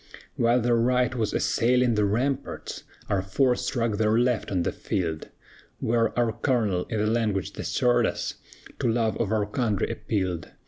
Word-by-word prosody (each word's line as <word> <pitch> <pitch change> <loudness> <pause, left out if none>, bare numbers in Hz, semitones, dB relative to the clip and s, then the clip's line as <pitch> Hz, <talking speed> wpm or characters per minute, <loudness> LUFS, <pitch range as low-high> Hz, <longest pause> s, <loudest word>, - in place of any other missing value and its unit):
"While 120 +1 +3
their 120 +1 +2
right 125 +1 +2
was 115 -4 -1
assailing 125 +1 +2
the 105 -1 +2
ramparts, 130 +7 -2 0.2
Our 100 -2 +1
force 125 +7 +1
struck 115 -4 0
their 110 +1 +2
left 120 -1 +1
on 90 -3 0
the - - 0
field, 80 -4 -3 0.5
Where 115 0 +2
our 120 -2 +2
colonel, 110 -7 0
in 110 -1 0
language 105 -5 -1
that - - -6
stirred - - +2
us, - - -3 0.5
To - - +1
love 110 -3 +1
of 110 -3 -1
our 110 -2 +1
country 105 -2 -1
appealed. 95 -6 -2
110 Hz, 165 wpm, -26 LUFS, 100-120 Hz, 0.5 s, While